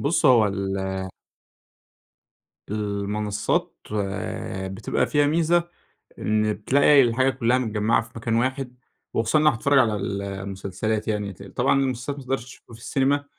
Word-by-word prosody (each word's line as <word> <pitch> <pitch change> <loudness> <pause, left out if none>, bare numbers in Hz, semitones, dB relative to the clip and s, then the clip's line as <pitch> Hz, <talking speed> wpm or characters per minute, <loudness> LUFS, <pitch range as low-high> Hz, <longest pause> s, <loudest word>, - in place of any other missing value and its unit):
بُص 160 +3 +2
هو 120 -4 +6
ال 95 -1 -2 1.9
المنصات، 105 0 -1 0.9
بتبقى 95 +3 -1
فيها 145 -1 +3
ميزة، 170 +2 +2 0.5
إن 110 0 +1
بتلاقي 140 +7 +5
الحاجة 130 +2 +3
كلّها 125 -1 +1
متجمعة 110 -3 +1
في 115 - -13
مكان 115 0 -1
واحد، 130 +1 -1 0.4
وخصوصًا 115 +7 +2
لو 155 - +3
أنا 150 - +4
هاتفرج 140 +5 +3
على 110 -4 +3
المسلسلات 100 +2 -3
يعني، 105 -2 -2
ط 95 - -13
طبعًا 125 +7 +1
المسلات 130 +2 -2
ما 140 - -8
تقدرش 130 -2 -2
تشوفها 130 -2 -15
في 115 - -16
السينما، 140 +3 +1
115 Hz, 135 wpm, -24 LUFS, 105-135 Hz, 1.9 s, هو